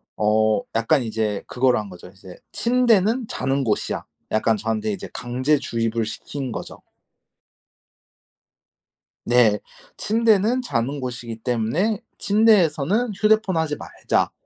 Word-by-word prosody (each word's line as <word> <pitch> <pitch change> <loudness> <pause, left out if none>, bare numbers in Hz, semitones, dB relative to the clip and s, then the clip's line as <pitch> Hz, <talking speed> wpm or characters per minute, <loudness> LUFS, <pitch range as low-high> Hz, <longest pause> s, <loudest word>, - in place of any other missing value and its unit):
어 105 0 +2
약간 125 +5 +2
이제 110 -2 -2
그거로 125 0 +2
한 105 -2 -4
거죠. 90 -1 -12
이제 95 -1 -14 0.2
'침대는 235 -1 +2
자는 135 -3 -1
곳이야.' 105 -3 -1 0.3
약간 110 +1 +2
저한테 110 0 -2
이제 95 - -7
강제 130 +5 0
주입을 115 -3 -1
시킨 130 +3 -6
거죠. - - -8 2.4
네. 120 -4 +4 0.4
'침대는 225 +2 +2
자는 140 - -2
곳이기 120 -3 -6
때문에 135 - 0 0.2
침대에서는 205 - +3
휴대폰 215 -2 +2
하지 160 -2 0
말자.' - - -1
130 Hz, 255 characters per minute, -22 LUFS, -, 2.4 s, 네